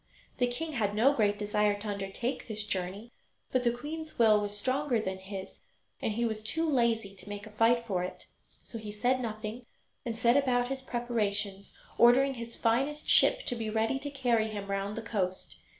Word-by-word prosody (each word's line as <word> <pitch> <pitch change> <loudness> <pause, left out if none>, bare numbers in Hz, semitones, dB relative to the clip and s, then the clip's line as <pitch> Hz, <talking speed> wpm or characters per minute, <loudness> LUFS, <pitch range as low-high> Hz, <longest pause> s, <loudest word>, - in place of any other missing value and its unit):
The 245 - +3
king 310 +7 -4
had 210 -7 -1
no 255 +7 +5
great 205 -5 +2
desire 210 0 +1
to 215 - -6
undertake 200 +5 -3
this 215 -2 -1
journey, 195 +3 -4 0.4
but 255 -1 +1
the 240 - +4
queen's 310 +6 -6
will 215 -3 +5
was 205 0 -3
stronger 255 +2 +1
than 190 -3 -3
his, 190 0 -8 0.4
and 220 - 0
he 235 +2 0
was 220 -2 -2
too 325 +9 0
lazy 235 -7 +1
to 195 +1 -13
make 205 +1 -6
a 215 - -11
fight 230 +2 +3
for 190 -5 -1
it. 185 0 -7 0.4
So 230 - -7
he 215 -1 -6
said 245 +5 +1
nothing 225 0 -5 0.4
and 230 -2 -3
set 235 +1 +4
about 250 -3 +2
his 270 0 -3
preparations, 210 -6 -2 0.2
ordering 265 +3 +6
his 235 -2 -7
finest 270 +6 0
ship - - +6
to 245 - -1
be 225 -2 -3
ready 225 +4 0
to 285 - -5
carry 245 -5 +1
him 205 -2 -5
round 195 +1 -2
the 230 - -4
coast. 185 -5 -3
225 Hz, 195 wpm, -30 LUFS, 205-245 Hz, 0.4 s, ordering